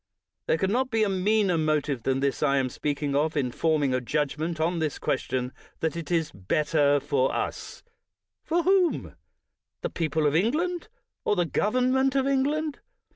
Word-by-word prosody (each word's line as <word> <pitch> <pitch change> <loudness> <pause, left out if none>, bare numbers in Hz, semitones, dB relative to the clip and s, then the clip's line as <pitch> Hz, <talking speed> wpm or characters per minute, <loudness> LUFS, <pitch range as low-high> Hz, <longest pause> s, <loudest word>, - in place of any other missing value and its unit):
There - - +3
can 190 +3 0
not 260 +3 +1
be 225 -3 +2
a 210 - +1
meaner 195 -2 +2
motive 150 -4 0
than 135 +2 0
this 140 -1 0
I 140 -2 +3
am 130 -1 +1
speaking 145 0 -2
of, 155 +2 +1
in 130 -3 0
forming 150 -2 +1
a 130 - 0
judgment 155 +5 -2
on 170 +2 0
this 155 -2 -1
question: 130 -1 -2 0.3
that 160 0 -1
it 165 -3 -6
is 165 -3 0
" - - -30 0.2
better 150 -2 +3
for 135 -1 +1
us - - -4
' - - -57
' - - -63
— - - -61
for 340 +1 0
whom? 370 -2 +2 0.7
the - - -3
people 160 -2 -1
of 145 0 +2
England, 325 - 0 0.4
or - - +1
the 175 -2 +1
government 255 - +1
of 270 -1 +2
England? 285 +3 0
160 Hz, 185 wpm, -26 LUFS, 145-230 Hz, 0.7 s, There